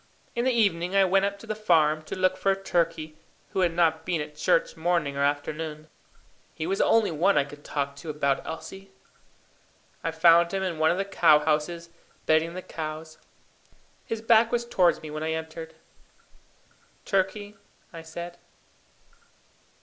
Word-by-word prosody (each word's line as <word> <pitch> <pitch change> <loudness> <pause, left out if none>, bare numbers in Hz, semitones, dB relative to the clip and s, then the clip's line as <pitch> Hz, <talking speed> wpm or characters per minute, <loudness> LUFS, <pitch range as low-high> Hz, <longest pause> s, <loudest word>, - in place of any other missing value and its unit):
In 235 +1 -1
the 260 - +3
evening 195 -6 +1
I 195 -1 +5
went 195 +1 +3
up 200 0 -3
to 200 - -13
the 215 - -3
farm 160 -7 +2
to - - -5
look 185 0 +2
for 195 +1 +1
Turkey, 165 -5 -2 0.3
who - - -3
had 180 -2 +3
not 160 -2 +2
been 170 -1 -1
at 150 0 -6
church 155 - +1
morning 165 -4 0
or 140 - -2
afternoon. 150 +2 -3 0.7
He 155 - -4
was 195 +3 -1
the - - +4
only 225 -5 +3
one 175 +5 +2
I 145 - +4
could 145 +1 -13
talk 140 -1 -3
to 150 +3 -9
about 140 -2 0
Elsie. 195 +4 -8 1.1
I - - 0
found 170 +1 +5
him 190 - -1
in 175 -4 -3
one 155 0 +4
of 175 - +1
the 195 - -1
cow 175 -6 +5
houses, 155 +3 -1 0.3
bedding 160 +2 +2
the 185 - -6
cows. 155 0 -7 0.8
His 225 -1 -5
back 225 0 +4
was 240 -1 0
towards 180 -9 +2
me 155 - -7
when 155 0 -5
I 160 0 -1
entered. 160 0 -7 1.3
"Turkey," 205 +2 -1 0.4
I 165 - -8
said. 170 +2 -8
165 Hz, 170 wpm, -26 LUFS, 155-195 Hz, 1.3 s, I